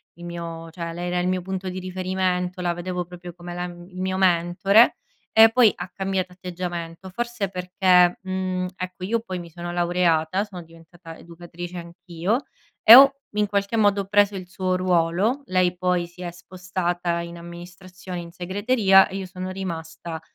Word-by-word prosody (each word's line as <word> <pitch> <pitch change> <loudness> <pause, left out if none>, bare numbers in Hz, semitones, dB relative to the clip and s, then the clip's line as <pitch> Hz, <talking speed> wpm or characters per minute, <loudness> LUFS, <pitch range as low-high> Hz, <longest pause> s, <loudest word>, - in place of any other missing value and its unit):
il 175 - -11
mio 170 -1 -6
cioè 170 0 -5
lei 175 +1 -4
era 180 0 0
il 180 - 0
mio 185 0 0
punto 190 +1 -4
di 185 +1 -5
riferimento, 185 0 -2
la 175 -1 0
vedevo 180 +1 -4
proprio 175 0 -10
come 175 0 -9
la 175 - -3
il 180 +1 -8
mio 185 0 -1
mentore, 185 +4 +4 0.4
e 220 0 +9
poi 230 -2 +5
ha 180 +1 -7
cambiato 190 -2 -2
atteggiamento. 180 -1 -6
Forse 235 0 -3
perché 180 -1 +3
mhmm, 185 -1 -2
ecco 185 0 -7
io 225 +4 0
poi 185 -5 -5
mi 170 -1 -9
sono 175 +1 -7
laureata, 175 0 +1
sono 195 -4 -9
diventata 165 0 -14
educatrice 175 +1 -9
anch’io 175 - -3 0.4
e 220 - +11
ho 270 +3 +11 0.2
in 210 0 0
qualche 200 +2 -1
modo 205 -2 +2
preso 205 0 +3
il 185 -2 -7
suo 185 0 -1
ruolo. 185 +7 +1
Lei 185 -3 +1
poi 180 -1 0
si 175 +1 -14
è 175 - -4
spostata 175 -1 -3
in 170 0 -8
amministrazione, 180 +1 -9
in 170 -1 -9
segreteria 195 +2 +3
e - - -8
io 195 -1 -4
sono 185 0 -6
rimasta 165 -3 -6
180 Hz, 170 wpm, -23 LUFS, 175-190 Hz, 0.4 s, e